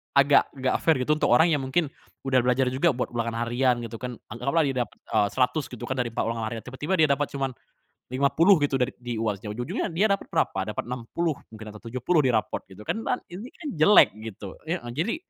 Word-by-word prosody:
agak 140 Hz, +1 st, +5 dB
enggak 130 Hz, -1 st, 0 dB
fair 160 Hz, -, +4 dB
gitu 150 Hz, +4 st, +2 dB
untuk -, -, +1 dB
orang 165 Hz, +2 st, +6 dB
yang 145 Hz, -4 st, +1 dB
mungkin 145 Hz, +3 st, 0 dB, 0.4 s
udah 130 Hz, -1 st, +3 dB
belajar 125 Hz, +1 st, +2 dB
juga 145 Hz, +5 st, +2 dB
buat 125 Hz, -, -2 dB
ulangan 115 Hz, -1 st, -2 dB
harian 120 Hz, 0 st, +1 dB
gitu 115 Hz, 0 st, -6 dB
kan. 125 Hz, -1 st, -5 dB, 0.2 s
Anggaplah 140 Hz, +8 st, +1 dB
dia 135 Hz, -, -2 dB
dapet, -, -, -24 dB, 0.2 s
eee, 105 Hz, -, +3 dB
100 130 Hz, +3 st, +1 dB
gitu 125 Hz, -, -8 dB
kan 130 Hz, -, -2 dB
dari 125 Hz, -, +1 dB
4 -, -, 0 dB
ulangan 115 Hz, -1 st, -2 dB
harian, 115 Hz, -2 st, -5 dB
tiba-tiba 145 Hz, +8 st, -2 dB
dia 155 Hz, -, +5 dB
dapet 145 Hz, +1 st, +1 dB
cuman 135 Hz, -1 st, -1 dB, 0.6 s
50 140 Hz, +8 st, +4 dB
gitu 140 Hz, -2 st, +1 dB
dari 125 Hz, +1 st, +1 dB
di 120 Hz, -1 st, -4 dB
UAS-nya. 105 Hz, -1 st, -2 dB
Ujung-ujungnya 120 Hz, +2 st, -2 dB
dia 195 Hz, +6 st, +3 dB
dapet 200 Hz, -, 0 dB
berapa? 95 Hz, +1 st, 0 dB
Dapet -, -, -4 dB
60 125 Hz, +7 st, -2 dB, 0.2 s
mungkin 110 Hz, 0 st, -9 dB
atau 105 Hz, -, -12 dB
70 130 Hz, +7 st, +1 dB
di 130 Hz, -, +3 dB
rapot 110 Hz, -, 0 dB
gitu 95 Hz, +2 st, -11 dB
kan. 225 Hz, -, -1 dB
Ban -, -, 0 dB
ini 205 Hz, +8 st, -7 dB
kan 310 Hz, -, -8 dB
jelek 155 Hz, +7 st, +7 dB
gitu, 105 Hz, -3 st, -8 dB
heeh. 170 Hz, +3 st, -1 dB, 0.2 s
Jadi, 170 Hz, -, -1 dB
130 Hz, 220 wpm, -26 LUFS, 120-155 Hz, 0.6 s, jelek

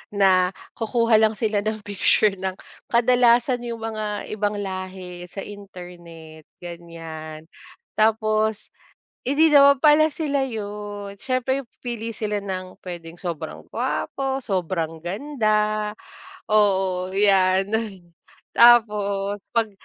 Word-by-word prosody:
na 185 Hz, -2 st, +3 dB, 0.2 s
kukuha 230 Hz, 0 st, +3 dB
lang 220 Hz, 0 st, +3 dB
sila 210 Hz, -1 st, 0 dB
ng 215 Hz, 0 st, -3 dB
picture 205 Hz, 0 st, +2 dB
ng 190 Hz, -1 st, -3 dB, 0.3 s
kadalasan 245 Hz, 0 st, +3 dB
yung 230 Hz, -1 st, -6 dB
mga 215 Hz, -2 st, -3 dB
ibang 210 Hz, -1 st, -1 dB
lahi 185 Hz, -2 st, -7 dB
sa 195 Hz, +2 st, -7 dB
internet, 175 Hz, -5 st, -12 dB, 0.2 s
ganiyan. 165 Hz, -2 st, -8 dB, 0.6 s
Tapos 215 Hz, 0 st, +1 dB, 0.5 s
hindi 295 Hz, +5 st, +4 dB
naman 280 Hz, -1 st, +7 dB
pala 310 Hz, +1 st, +6 dB
sila 285 Hz, -3 st, -1 dB
yun, 205 Hz, -3 st, -6 dB
siyempre 260 Hz, +1 st, -1 dB, 0.2 s
pipili 230 Hz, -2 st, -5 dB
sila 210 Hz, -1 st, -2 dB
ng 185 Hz, -1 st, -5 dB
puwedeng 170 Hz, -2 st, -8 dB
sobrang 170 Hz, -4 st, -5 dB
gwapo, 270 Hz, -1 st, -2 dB
sobrang 170 Hz, -4 st, -2 dB
ganda, 215 Hz, -, 0 dB, 0.6 s
oo, 190 Hz, -3 st, +2 dB
yan, 195 Hz, -1 st, +3 dB, 0.9 s
tapos 205 Hz, -4 st, +4 dB, 0.2 s
'pag 225 Hz, -2 st, +1 dB
205 Hz, 105 wpm, -23 LUFS, 185-230 Hz, 0.9 s, naman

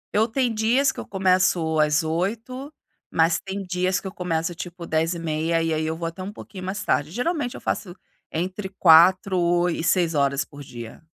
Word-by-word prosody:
Eu 220 Hz, +2 st, +4 dB
tem 245 Hz, 0 st, 0 dB
dias 235 Hz, +6 st, +2 dB
que -, -, -10 dB
eu -, -, -7 dB
começo 185 Hz, -4 st, +2 dB
às 150 Hz, +1 st, +3 dB
8:00, 225 Hz, -, -3 dB, 0.4 s
mas 165 Hz, +1 st, +2 dB
tem 195 Hz, 0 st, -5 dB
dias 185 Hz, 0 st, 0 dB
que -, -, -17 dB
eu 190 Hz, -, -4 dB
começo, 170 Hz, -2 st, -2 dB
tipo, 170 Hz, +1 st, -8 dB
10:30 165 Hz, 0 st, 0 dB
e 165 Hz, -1 st, 0 dB
aí 155 Hz, -, -1 dB
eu 160 Hz, -, -2 dB
vou 165 Hz, -, -4 dB
até 165 Hz, +3 st, -7 dB
pouquinho 190 Hz, -3 st, -10 dB
mais 190 Hz, +3 st, -4 dB
tarde. 145 Hz, +1 st, +1 dB
Geralmente 250 Hz, -, -2 dB
eu -, -, -7 dB
faço 180 Hz, -4 st, -3 dB, 0.4 s
entre 185 Hz, +4 st, -3 dB
4 185 Hz, +1 st, +5 dB
o 175 Hz, 0 st, +2 dB
e 165 Hz, -, -3 dB
6 170 Hz, -1 st, +2 dB
horas 140 Hz, -1 st, +1 dB
por 145 Hz, -1 st, -12 dB
dia. 120 Hz, 0 st, -10 dB
175 Hz, 190 wpm, -24 LUFS, 160-195 Hz, 0.4 s, 4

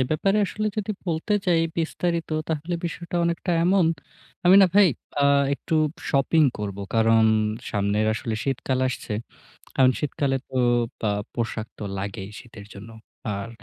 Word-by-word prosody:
এ -, -, +4 dB
ব্যাপারে 195 Hz, +6 st, +2 dB
আসলে 215 Hz, +3 st, -3 dB
যদি 215 Hz, 0 st, -2 dB, 0.2 s
বলতে 165 Hz, +4 st, -1 dB
চাই 170 Hz, -2 st, +4 dB, 0.2 s
বিস্তারিত 170 Hz, +1 st, -1 dB, 0.2 s
তাহলে 160 Hz, +2 st, -2 dB
বিষয়টা 170 Hz, +1 st, -4 dB
অনেকটা 170 Hz, +2 st, -1 dB
এমন। 185 Hz, -1 st, +4 dB, 0.6 s
আমি 180 Hz, +2 st, +7 dB
না -, -, +7 dB
ভাই 200 Hz, -2 st, +7 dB, 0.3 s
আ -, -, +5 dB, 0.3 s
একটু 160 Hz, -, -4 dB, 0.4 s
shopping 145 Hz, +3 st, +3 dB
করব। 100 Hz, -2 st, -4 dB, 0.2 s
কারণ 115 Hz, 0 st, +4 dB, 0.5 s
সামনের 105 Hz, +1 st, +1 dB
আসলে 115 Hz, 0 st, -3 dB
শীতকাল 135 Hz, -1 st, -1 dB
আসছে। 120 Hz, -3 st, -5 dB, 0.6 s
কারণ 130 Hz, -1 st, +5 dB
শীতকালে 140 Hz, -2 st, -1 dB
তো -, -, -9 dB, 0.5 s
আ -, -, +2 dB, 0.2 s
পোশাক 115 Hz, -2 st, -3 dB
তো -, -, -5 dB
লাগেই 95 Hz, 0 st, -5 dB
শীতের 115 Hz, -4 st, -12 dB
জন্য। 100 Hz, +3 st, -10 dB, 0.4 s
আর 100 Hz, +2 st, -4 dB
140 Hz, 145 wpm, -24 LUFS, 110-170 Hz, 0.6 s, আমি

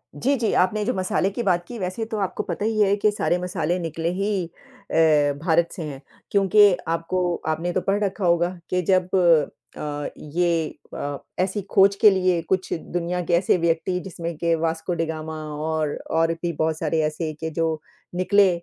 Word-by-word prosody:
जी, 275 Hz, +3 st, +1 dB
जी, 230 Hz, -4 st, 0 dB
आपने 205 Hz, +4 st, +2 dB
जो 250 Hz, -, 0 dB
मसाले 185 Hz, 0 st, 0 dB
की 235 Hz, -, -3 dB
बात 175 Hz, -4 st, +1 dB
की 240 Hz, +5 st, -8 dB
वैसे 185 Hz, +4 st, -3 dB
तो 215 Hz, -, -1 dB
आपको 195 Hz, -, -2 dB
पता 195 Hz, +1 st, -3 dB
ही 220 Hz, -1 st, 0 dB
है 200 Hz, 0 st, +4 dB
कि 210 Hz, +1 st, +3 dB
सारे 180 Hz, -3 st, 0 dB
मसाले 180 Hz, -1 st, -1 dB
निकले 165 Hz, 0 st, -2 dB
ही 195 Hz, +2 st, -1 dB, 0.6 s
अ, 150 Hz, -3 st, +4 dB
भारत 170 Hz, 0 st, +3 dB
से 175 Hz, -, -6 dB
हैं, 140 Hz, -2 st, -7 dB, 0.3 s
क्योंकि 200 Hz, 0 st, +6 dB, 0.2 s
आपको 170 Hz, +1 st, 0 dB
आपने 165 Hz, +3 st, -1 dB
तो 185 Hz, -, +1 dB
पढ़ 205 Hz, +1 st, +2 dB
रखा 195 Hz, -1 st, -1 dB
होगा 170 Hz, 0 st, +3 dB, 0.2 s
कि 180 Hz, 0 st, +1 dB
जब 185 Hz, 0 st, +2 dB, 0.7 s
अ, 145 Hz, -1 st, -4 dB
ये 165 Hz, +1 st, 0 dB, 0.3 s
अ, 145 Hz, 0 st, -3 dB, 0.2 s
ऐसी 190 Hz, +2 st, 0 dB
खोज 195 Hz, +1 st, +5 dB
के 210 Hz, -, +7 dB
लिए 185 Hz, -3 st, +2 dB
कुछ 190 Hz, 0 st, 0 dB
दुनिया 175 Hz, +1 st, -3 dB
के 175 Hz, -, -1 dB
ऐसे 180 Hz, +2 st, +3 dB
व्यक्ति 170 Hz, +2 st, 0 dB
जिसमें 170 Hz, -3 st, -6 dB
के 170 Hz, 0 st, +1 dB
वास्को 165 Hz, +2 st, -2 dB
डी 165 Hz, -1 st, 0 dB
गामा 160 Hz, 0 st, -5 dB, 0.2 s
और, 155 Hz, -1 st, -1 dB, 0.2 s
और 165 Hz, +1 st, +2 dB
भी 170 Hz, 0 st, -3 dB
बहुत 160 Hz, +1 st, 0 dB
सारे 160 Hz, 0 st, 0 dB
ऐसे 155 Hz, +1 st, -2 dB
के 160 Hz, -, -3 dB
जो 160 Hz, -2 st, 0 dB, 0.3 s
निकले 195 Hz, +2 st, +4 dB
175 Hz, 185 wpm, -23 LUFS, 160-190 Hz, 0.7 s, के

